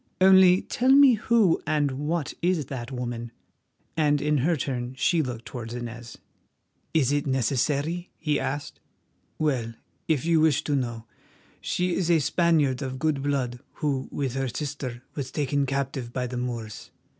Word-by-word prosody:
"Only 190 -1 +6
tell 255 +2 0
me 275 -1 +8
who 220 -5 +3
and 150 -2 +1
what 150 +3 -2
is 170 -3 +1
that 125 -1 -6
woman?" 120 -2 -4 0.6
and 150 -2 +2
in 150 0 +1
her 165 +6 +2
turn 125 -2 -3
she 165 +4 +2
looked 125 -5 -5
towards 120 -2 -6
Inez. 120 -1 -7 0.7
"Is 145 -5 +2
it 145 0 0
necessary?" 140 +6 0
he 150 -3 0
asked. 145 +2 -4 0.6
"Well, 125 -7 -1 0.3
if 155 -3 +1
you 165 -1 +3
wish 155 -3 +3
to 145 - 0
know, 120 -4 -3 0.6
she 180 0 -1
is 175 -2 0
a 170 - +5
Spaniard 150 -3 +2
of 130 -1 -4
good 145 0 0
blood 135 -4 -1
who 140 -4 -2
with 135 -4 -2
her 135 0 -1
sister 130 -2 -5
was 135 -3 -4
taken 140 -1 0
captive 135 -2 -3
by 125 0 -2
the 125 0 -5
Moors. 120 -4 -5
140 Hz, 155 wpm, -26 LUFS, 125-160 Hz, 0.7 s, me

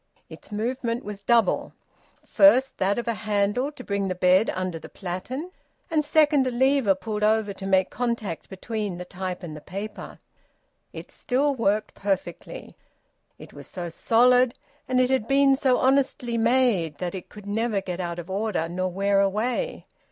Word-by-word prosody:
Its - - -12
movement 235 +2 -2
was 205 -1 -7
double: 235 +2 +2 0.5
first 235 +6 +4
that 195 +3 +1
of 240 - -3
a 235 - +1
handle 215 +5 0
to 270 -4 -11
bring 200 -2 -1
the 185 - -2
bed 185 +4 +4
under 185 -3 -3
the - - -11
platen, 220 - -5 0.4
and 310 -2 +2
second, 295 -2 +3
a - - +2
lever 260 -4 +3
pulled 210 +2 -4
over 215 -1 +2
to 195 0 -7
make 190 -1 +2
contact 235 -8 -3
between 205 -1 -4
the 180 - -7
type 185 0 -5
and 160 -3 -7
the 150 - -9
paper. 200 +5 -7 0.7
It - - -10
still 280 +3 0
worked 215 -4 0
perfectly. 200 - -4 0.6
It - - -13
was - - -11
so 175 -2 -6
solid, 245 +7 +3 0.3
and 255 -1 +1
it 255 0 +3
had 260 -4 +1
been 275 0 +4
so 260 -2 +2
honestly 260 -2 +1
made, 230 - +2
that 175 +1 -4
it 190 -2 -8
could 210 -1 -12
never 215 +1 0
get 180 -2 -5
out 170 -1 -3
of 175 -1 -7
order 195 -3 -1
nor 185 +2 -2
wear 195 +2 +2
away. 225 - -1
210 Hz, 170 wpm, -25 LUFS, 190-250 Hz, 0.7 s, first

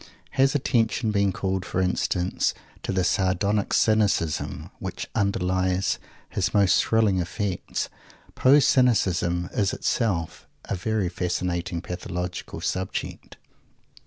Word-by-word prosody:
Has 135 +1 +3
attention 115 -4 +1
been 100 -2 +2
called, 95 0 -2
for 90 - -3
instance, 90 0 0 0.3
to - - -3
the 95 -1 +1
sardonic 100 +3 +1
cynicism 100 -7 +1
which - - -5
underlies 95 -2 +1 0.3
his - - -1
most 100 -3 +4
thrilling 110 -4 +2
effects? 95 +1 -2 0.5
Poe's 140 +2 +5
cynicism 90 -8 +2
is 100 -2 +1
itself 85 -8 -1 0.2
a - - -3
very 105 +1 -1
fascinating 85 -1 -2
pathological 90 0 -5
subject. 95 0 -4
95 Hz, 105 wpm, -25 LUFS, 90-105 Hz, 0.5 s, Poe's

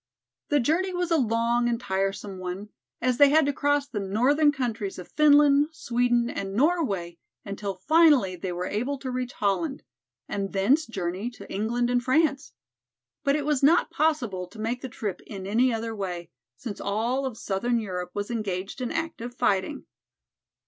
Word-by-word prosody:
The 290 - +3
journey 330 +9 +1
was 355 -1 -1
a 330 - +4
long 235 -1 +1
and 235 -1 -1
tiresome 195 -1 -2
one, 185 +3 -5 0.3
as 250 0 +1
they 285 -1 +8
had 310 +1 +5
to 285 - 0
cross 290 0 +1
the 225 -7 -4
northern 255 +10 +3
countries 230 -7 -3
of 180 - -10
Finland, 290 -1 +5
Sweden 240 -4 +1
and 195 -4 -4
Norway 220 - 0 0.3
until 200 -1 -4
finally 280 - +4
they 180 +1 -4
were 175 +1 -3
able 245 +9 -2
to 260 -1 -5
reach 250 0 -3
Holland, 270 +9 -1 0.4
and 195 -1 -3
thence 250 +11 +3
journey 190 +1 -3
to 245 - -12
England 240 +4 0
and 245 0 +1
France. 275 +1 +1 0.7
But 280 0 +2
it 295 -2 -1
was 295 -3 +1
not 315 +5 +4
possible 240 - 0
to 200 - -16
make 230 +3 -2
the 260 - -5
trip 210 -4 -4
in 195 -3 -7
any 235 +6 +2
other 225 0 -3
way, 180 -4 -5 0.3
since 220 -5 -6
all 235 +7 0
of 240 -4 -7
southern 235 +5 -1
Europe 180 -4 -4
was 205 +2 -3
engaged 195 0 -3
in 245 - -2
active 325 -8 -4
fighting. 205 +7 0
235 Hz, 170 wpm, -26 LUFS, 195-280 Hz, 0.7 s, they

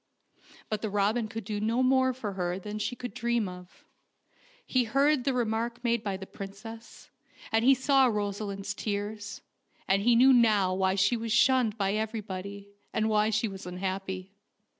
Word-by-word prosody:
But 215 -1 -3
the 220 - -2
robin 210 +3 +1
could 225 0 -6
do 205 +1 -4
more 255 +4 +3
for 235 -5 -5
her 180 -1 -2
than 210 +2 -6
she 245 - -2
could 245 -3 -7
dream 235 -2 0
of. 180 0 -12 0.8
He 255 -2 +1
heard 275 +3 +2
the 275 - +2
remark 235 0 -1
made 235 -2 +1
by 200 -2 -2
the 190 - -8
princess, 215 +4 -10 0.4
and 225 0 +2
he 270 +2 +6
saw 270 0 +4
Rosaleen's 200 -2 -3
tears, 205 0 -4 0.5
and 195 +1 +3
he 235 +3 +4
knew 260 +3 +7
now 210 -6 +4
why 190 0 +1
she 200 +5 +3
was 230 -1 -4
shunned 240 -1 +3
by 195 -1 0
every 220 +1 -2
body, 200 +1 -7 0.2
and 220 0 0
why 215 0 +3
she 220 +1 +1
was 195 -2 -8
so 180 - -7
unhappy. 190 +1 -4
215 Hz, 175 wpm, -29 LUFS, 195-235 Hz, 0.8 s, knew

